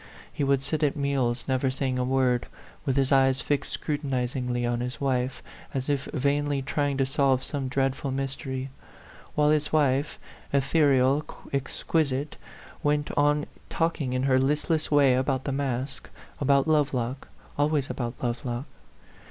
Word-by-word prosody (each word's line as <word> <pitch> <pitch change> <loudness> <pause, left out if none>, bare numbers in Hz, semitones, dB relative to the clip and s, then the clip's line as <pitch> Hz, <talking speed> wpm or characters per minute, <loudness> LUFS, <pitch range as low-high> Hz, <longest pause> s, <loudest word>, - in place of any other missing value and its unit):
He - - -2
would 135 -1 +2
sit 150 +3 -2
at 145 -3 +2
meals 135 -4 0
never 130 0 +1
saying 130 -1 -1
a - - +1
word, 125 -1 +1 0.4
with 135 - +2
his 135 0 +2
eyes 135 -1 +4
fixed 145 -2 -1
scrutinizingly 125 -4 -2
on 120 0 0
his 125 +1 -4
wife, 130 -2 -1 0.3
as 130 +1 -2
if 140 -2 0
vainly 145 0 0
trying 145 0 0
to 135 - +2
solve 135 -1 +2
some 140 -3 -2
dreadful 135 +1 0
mys 135 0 -2
tery; 130 -2 -5 0.7
while 150 0 +4
his 150 -1 +1
wife, 145 -1 +2 0.3
ethereal, 140 -1 +3 0.3
exquisite, 140 +1 -1 0.5
went 145 0 +1
on 145 0 +3 0.2
talking 160 -6 -1
in 130 0 0
her 130 -1 +4
listless 150 +4 +1
way 140 -3 +5
about 130 +1 0
the 140 - -2
masque, 135 -2 -3 0.3
about 140 +1 +3
Lovelock, 135 -4 0 0.3
always 145 -2 +1
about 120 -1 -3
Love 120 +2 -1
lock. 120 +1 -3
135 Hz, 150 wpm, -27 LUFS, 130-145 Hz, 0.7 s, way